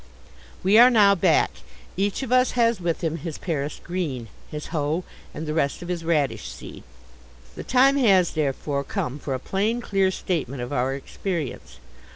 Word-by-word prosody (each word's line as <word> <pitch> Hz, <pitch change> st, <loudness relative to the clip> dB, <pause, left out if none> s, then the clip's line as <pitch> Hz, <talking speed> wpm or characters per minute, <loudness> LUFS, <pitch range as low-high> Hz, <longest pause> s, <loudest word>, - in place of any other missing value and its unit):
We 200 Hz, +4 st, +6 dB
are 245 Hz, +1 st, +9 dB
now 210 Hz, -5 st, +6 dB
back. 175 Hz, -4 st, +3 dB, 0.4 s
Each 200 Hz, +6 st, -1 dB
of 255 Hz, -, -5 dB
us 255 Hz, 0 st, +4 dB
has 230 Hz, -4 st, +2 dB
with 170 Hz, -1 st, -2 dB
him 165 Hz, 0 st, -1 dB
his 165 Hz, 0 st, -6 dB
Paris 150 Hz, -4 st, -3 dB
Green, 145 Hz, -11 st, -4 dB, 0.2 s
his 150 Hz, 0 st, -6 dB
hoe 155 Hz, +3 st, 0 dB, 0.3 s
and 160 Hz, -, -6 dB
the 155 Hz, -, -3 dB
rest 155 Hz, +1 st, -1 dB
of 175 Hz, -, -8 dB
his 175 Hz, -2 st, -3 dB
radish 155 Hz, -4 st, 0 dB
seed. -, -, -10 dB, 0.7 s
The -, -, -7 dB
time 270 Hz, +3 st, +4 dB
has, 195 Hz, -9 st, +4 dB
therefore, 140 Hz, -1 st, -1 dB
come 135 Hz, 0 st, -3 dB
for 135 Hz, -2 st, -3 dB
a -, -, -4 dB
plain, 210 Hz, -, -1 dB
clear 195 Hz, -5 st, +1 dB
statement 140 Hz, -9 st, -3 dB
of 120 Hz, -, -5 dB
our 130 Hz, 0 st, 0 dB
experience. 140 Hz, -, -5 dB
170 Hz, 175 wpm, -24 LUFS, 145-200 Hz, 0.7 s, are